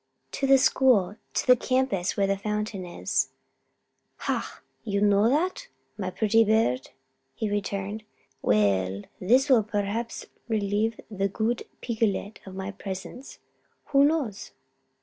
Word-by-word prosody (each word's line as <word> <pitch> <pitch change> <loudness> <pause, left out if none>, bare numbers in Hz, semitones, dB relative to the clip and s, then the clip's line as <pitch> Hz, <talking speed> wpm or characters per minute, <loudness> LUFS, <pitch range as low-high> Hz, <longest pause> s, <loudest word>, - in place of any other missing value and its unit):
"To 275 - -1
the 270 0 +7
school. 240 -8 +3 0.2
To - - 0
the 250 - +7
campus 255 -8 0
where 200 - +3
the 195 0 +1
fountain 210 -1 -3
is." 175 - -1 0.9
"Ha! - - -3 0.2
you 200 -3 -1
know 205 +2 +4
that, 360 - 0 0.3
my 190 -3 -3
pretty 220 +4 +3
bird?" 215 - +1 0.5
he 215 +5 -2
returned. 205 +1 -3 0.4
"Well! 100 -2 +2 0.2
this 250 +9 +3
will 255 -5 +6
perhaps 210 +2 -3 0.2
relieve 215 0 0
the 195 -1 0
good 225 +4 -1 0.2
Picolet 220 -3 -1
of 190 - -8
my 190 +1 -4
presence 195 +5 -8 0.5
who 275 -1 +5
knows?" 285 -9 0
210 Hz, 130 wpm, -26 LUFS, 195-235 Hz, 0.9 s, the